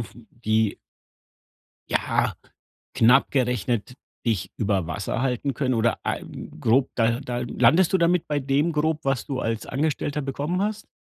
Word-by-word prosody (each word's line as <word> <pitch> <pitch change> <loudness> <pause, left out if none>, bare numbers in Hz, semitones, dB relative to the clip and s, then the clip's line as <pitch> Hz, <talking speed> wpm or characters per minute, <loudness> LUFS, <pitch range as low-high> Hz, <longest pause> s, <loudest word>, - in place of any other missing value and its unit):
f 115 - -8 0.3
die 110 -1 +2 1.1
Ja - - +1 0.6
knapp 125 +4 +5
gerechnet 125 -3 0 0.3
dich 110 -6 0
über 100 -5 0
Wasser 90 +8 -3
halten 135 +1 -1
können 130 -2 0
oder, 115 0 +1
ah - - -1 0.4
grob 130 +4 +3
da 115 0 +2
da 120 -3 -4
landest 125 +9 +3
du 190 - +4
damit 170 0 +2
bei 150 - +1
dem 140 +4 +1
Grob, 155 0 0
was 135 -4 0
du 135 -2 -3
als 115 -1 -2
Angestellter 145 +1 -1
bekommen 145 +7 -2
hast? 215 +1 -3
130 Hz, 145 wpm, -24 LUFS, 115-150 Hz, 1.1 s, knapp